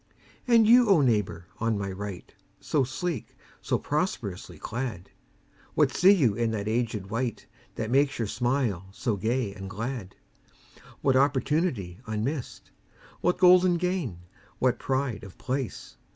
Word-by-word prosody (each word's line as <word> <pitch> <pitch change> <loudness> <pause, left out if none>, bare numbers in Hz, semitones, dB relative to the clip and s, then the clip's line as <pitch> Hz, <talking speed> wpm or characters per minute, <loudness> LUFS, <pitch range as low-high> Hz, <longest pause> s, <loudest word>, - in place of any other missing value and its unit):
And 230 -2 +6
you, 240 +1 +6
O 185 -6 +6
neighbour 105 -9 +1
on 115 -1 0
my 100 -1 -3
right 95 -1 -7 0.3
So 145 -3 +1
sleek, 145 - -4 0.3
so - - 0
prosperously 105 - -3
clad! 115 -2 -5 0.6
What - - +3
see 185 - +5
you 140 - +4
in 115 +2 0
that 105 -2 -3
aged 110 -3 -2
wight 115 0 -2 0.3
That 110 +1 -3
makes 140 +2 +3
your 115 - -1
smile 120 -6 -1
so 110 +2 -1
gay 110 +1 -1
and 95 -1 -8
glad? 110 -1 -5 0.9
What 135 -1 +3
opportunity 135 - +1
unmissed? 115 +6 -4 0.5
What 180 - +1
golden 180 0 +6
gain, 170 - -2 0.4
what 125 -1 +1
pride 130 -5 -1
of 100 -2 -11
place? 130 -2 -4
120 Hz, 135 wpm, -27 LUFS, 105-145 Hz, 0.9 s, And